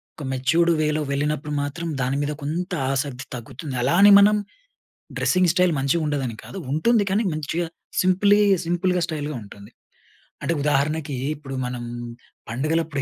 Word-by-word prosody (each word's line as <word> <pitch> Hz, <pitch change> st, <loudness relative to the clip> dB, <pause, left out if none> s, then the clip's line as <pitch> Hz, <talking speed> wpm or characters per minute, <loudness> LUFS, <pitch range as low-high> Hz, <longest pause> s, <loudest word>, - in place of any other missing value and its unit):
ఒక 150 Hz, -, -8 dB
మెచ్యూర్డ్ 160 Hz, +7 st, +2 dB
వేలో 150 Hz, 0 st, +1 dB
వెళ్ళినప్పుడు 150 Hz, +1 st, -1 dB
మాత్రం, 165 Hz, +4 st, -4 dB
దాని 130 Hz, +2 st, 0 dB
మీద 145 Hz, +1 st, -1 dB
కొంత 175 Hz, +5 st, -3 dB, 0.2 s
ఆసక్తి 135 Hz, -1 st, -3 dB
తగ్గుతుంది. 125 Hz, +4 st, -7 dB
అలా 135 Hz, +7 st, +2 dB
అని 205 Hz, 0 st, +9 dB
మనం 205 Hz, +1 st, +6 dB, 0.8 s
డ్రెస్సింగ్ 185 Hz, -1 st, +3 dB
స్టైల్ 180 Hz, -2 st, +3 dB
మంచిగుండదని 140 Hz, -4 st, 0 dB
కాదు. -, -, -9 dB
ఉంటుంది 210 Hz, +9 st, +3 dB
కానీ 200 Hz, +4 st, +1 dB
మంచిగా 155 Hz, +3 st, -2 dB, 0.3 s
సింప్లీ 200 Hz, +2 st, +4 dB, 0.3 s
సింపుల్‌గా, 180 Hz, +1 st, 0 dB
స్టైల్‌గా 150 Hz, -2 st, -4 dB
ఉంటుంది. 100 Hz, +2 st, -13 dB, 0.7 s
అంటే 170 Hz, -, 0 dB
ఉదాహరణకి 150 Hz, +1 st, 0 dB, 0.2 s
ఇప్పుడు 135 Hz, -2 st, -8 dB
మనం 125 Hz, -1 st, -4 dB, 0.7 s
పండుగలపుడు 155 Hz, +4 st, -1 dB
150 Hz, 135 wpm, -23 LUFS, 135-175 Hz, 0.8 s, అని